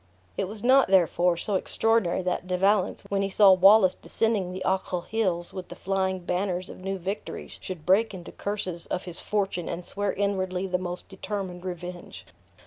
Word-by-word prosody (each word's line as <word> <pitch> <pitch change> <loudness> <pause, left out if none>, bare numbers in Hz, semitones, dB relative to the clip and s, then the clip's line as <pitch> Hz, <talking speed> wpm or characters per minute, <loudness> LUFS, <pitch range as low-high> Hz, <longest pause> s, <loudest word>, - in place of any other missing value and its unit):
It 195 - -1
was 210 +2 -8
not, 265 +2 +5
therefore, 180 -2 +3
so 205 +4 -3
extraordinary 200 -1 +1
that 180 0 -2
De 180 0 0
Valence, 195 +1 +2
when 200 0 +1
he 195 - 0
saw 200 0 +6
Wallace 190 +1 +7
descending 215 -5 -1
the 185 +1 -5
Ochil 185 -2 -1
hills 185 -6 -1
with 185 -2 -6
the - - -8
flying 190 -1 -1
banners 180 +1 -2
of - - -11
new 195 +1 -3
victories, 190 +3 -6
should 180 -5 -7
break 205 +5 +4
into 180 -3 -9
curses 185 -4 -4
of 185 - -3
his 175 -3 -6
fortune, 195 -4 -1
and 175 +1 -5
swear 205 -1 -1
inwardly 190 -2 -1
the 180 -1 -1
most 180 0 -5
determined 190 -2 -5
revenge. 180 -1 -7
190 Hz, 180 wpm, -26 LUFS, 180-200 Hz, -, Wallace